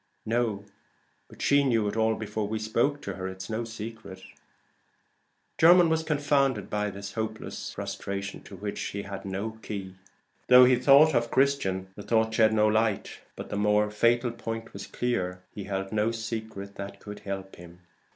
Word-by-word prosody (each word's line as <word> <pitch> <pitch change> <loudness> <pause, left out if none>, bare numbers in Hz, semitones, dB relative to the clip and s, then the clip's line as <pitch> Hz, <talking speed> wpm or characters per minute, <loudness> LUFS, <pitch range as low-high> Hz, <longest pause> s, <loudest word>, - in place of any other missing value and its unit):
"No; 110 -3 -1 0.6
but - - -9
she 140 0 +4
knew 115 -6 +2
it 100 - -3
all 110 0 +2
before 105 -1 -3
we 110 +1 -2
spoke 115 +7 0
to - - -4
her. 95 -1 -5
It's 95 +1 -7
no 110 +2 -1
secret." 110 -3 -8 1.4
Jermyn 175 +1 +7
was 160 0 +2
confounded 145 - +1
by 105 0 0
this 100 0 -8
hopeless 110 -1 -5
frustration 100 0 -5
to 100 - -10
which 100 +2 -5
he 100 0 -4
had 100 -1 -7
no 105 +4 -4
key. 95 -3 -6 0.5
Though 125 0 +9
he 125 0 +4
thought 140 +5 +6
of 120 -1 +1
Christian, 115 -10 +1
the - - -8
thought 110 +1 +1
shed 110 -1 +4
no 105 -1 +3
light; 110 -1 0 0.2
but - - -8
the 105 - -3
more 105 0 +2
fatal 120 +3 +2
point 115 -1 -6
was - - -7
clear: 90 -7 -2
he 100 - -6
held 95 -1 -3
no 110 +1 +1
secret 110 -3 -5
that 100 0 -7
could 105 0 -9
help 95 -1 -6
him. 85 0 -13
110 Hz, 170 wpm, -27 LUFS, 100-120 Hz, 1.4 s, Though